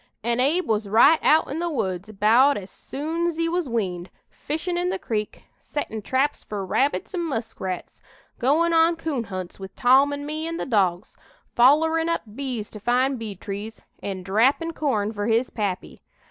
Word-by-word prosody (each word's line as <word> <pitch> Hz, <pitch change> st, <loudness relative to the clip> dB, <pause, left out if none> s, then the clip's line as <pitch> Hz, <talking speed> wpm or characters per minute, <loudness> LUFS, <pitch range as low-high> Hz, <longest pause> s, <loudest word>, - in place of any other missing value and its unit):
An' 235 Hz, +1 st, 0 dB
Abe 310 Hz, +8 st, +2 dB
was 215 Hz, -2 st, 0 dB
right 280 Hz, +10 st, +6 dB
out 315 Hz, -, +4 dB
in 300 Hz, -, -3 dB
the 345 Hz, 0 st, -1 dB
woods 190 Hz, -, -3 dB
about 225 Hz, +7 st, +4 dB
as 195 Hz, -1 st, -8 dB
soon's 325 Hz, +4 st, -3 dB
he 330 Hz, 0 st, +1 dB
was 340 Hz, -4 st, -1 dB
weaned, 185 Hz, -6 st, -2 dB, 0.2 s
fishin' 320 Hz, +4 st, -4 dB
in 355 Hz, +1 st, 0 dB
the 380 Hz, -, -1 dB
creek, 215 Hz, -, -4 dB, 0.2 s
settin' 220 Hz, -7 st, -5 dB
traps 265 Hz, +7 st, 0 dB
fur 200 Hz, -2 st, -5 dB
rabbits 280 Hz, -, 0 dB
an' 360 Hz, -, -1 dB
muskrats, 225 Hz, -, -4 dB, 0.4 s
goin' 320 Hz, +7 st, +2 dB
on 330 Hz, +1 st, +4 dB
coon 310 Hz, -7 st, -3 dB
hunts 185 Hz, -2 st, -7 dB
with 190 Hz, 0 st, -9 dB
Tom 265 Hz, +3 st, +5 dB
an' 285 Hz, 0 st, -4 dB
me 310 Hz, +2 st, -3 dB
an' 330 Hz, 0 st, -4 dB
the -, -, -3 dB
dogs, 195 Hz, -6 st, 0 dB, 0.4 s
follerin' 320 Hz, +6 st, +4 dB
up 335 Hz, -, -1 dB
bees 250 Hz, -6 st, -4 dB
to 215 Hz, -, -9 dB
find 250 Hz, +4 st, +1 dB
bee 215 Hz, -3 st, -6 dB
trees, 205 Hz, +3 st, -7 dB, 0.2 s
an' 190 Hz, -2 st, -5 dB
drappin' 255 Hz, -, +2 dB
corn 220 Hz, -9 st, -1 dB
fur 205 Hz, 0 st, -3 dB
his 230 Hz, +2 st, +1 dB
pappy. 200 Hz, -4 st, -4 dB
255 Hz, 175 wpm, -24 LUFS, 210-315 Hz, 0.4 s, right